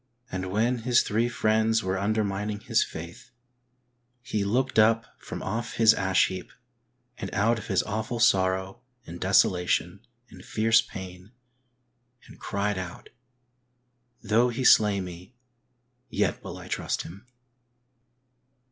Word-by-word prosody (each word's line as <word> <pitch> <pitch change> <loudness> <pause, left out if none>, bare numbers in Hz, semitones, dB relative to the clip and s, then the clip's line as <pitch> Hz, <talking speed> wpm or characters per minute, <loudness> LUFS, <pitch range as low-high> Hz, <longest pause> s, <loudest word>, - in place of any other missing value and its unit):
And 95 0 -4
when 115 +5 +1
his 120 +1 +3
three 115 +3 0
friends 110 -1 +1
were 95 0 -1
undermining 105 0 -1
his - - +2
faith, 85 +10 -9 0.9
he 110 -5 -2
looked 125 +4 +1
up 115 +1 +4
from - - -7
off 115 +4 -3
his 115 -1 +6
ash 95 -3 +2
heap, 95 -1 -6 0.7
and - - -5
out 115 +3 +2
of 105 - -10
his 95 -4 +1
awful 110 +3 -3
sorrow^ 95 -2 +2 0.3
and 85 +1 -9
desolation, 90 -1 +2 0.3
and - - -13
fierce 115 +1 +3
pain, 95 +3 -10 0.9
and - - -16
cried 100 0 -2
out, 90 -2 -8 1.1
"Though 115 +3 +3
He 120 +2 -3
slay 105 -5 +5
me 90 +5 -10 0.7
yet - - -1
will - - -7
I - - -10
trust - - -2
Him." 100 +9 -12
105 Hz, 130 wpm, -26 LUFS, 95-115 Hz, 1.1 s, his